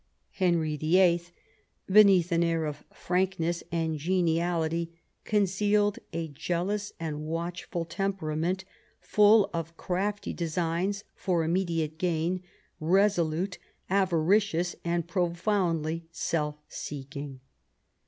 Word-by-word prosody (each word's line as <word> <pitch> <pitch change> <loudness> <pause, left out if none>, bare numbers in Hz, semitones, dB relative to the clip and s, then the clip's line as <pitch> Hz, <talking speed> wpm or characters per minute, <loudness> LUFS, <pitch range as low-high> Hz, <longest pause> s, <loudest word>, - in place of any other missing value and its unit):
Henry 170 -5 +1
VIII 170 +3 +4 0.6
beneath 195 -3 +6
an 170 0 +3
air 165 -1 +1
of 150 -1 -5
frankness 180 -2 -1
and 160 -2 -1
geniality 170 -1 0 0.3
con 210 -1 +2
cealed 205 +2 +1
a 165 -1 -3
jealous 180 +7 -2
and 155 -2 -4
watchful 170 +2 -4
temperament^ 180 -1 -2 0.4
full 210 +3 +5
of 165 0 -4
crafty 200 +3 -2
designs 175 +4 -1
for 175 -3 0
immediate 165 -2 -1
gain, 175 +1 0 0.4
resolute, 180 0 +2 0.3
avaricious, 180 -1 +2
and 170 -1 -1
profoundly 170 -3 0
self 150 -3 -1
seeking. 140 -1 -7
170 Hz, 95 wpm, -28 LUFS, 160-190 Hz, 0.6 s, beneath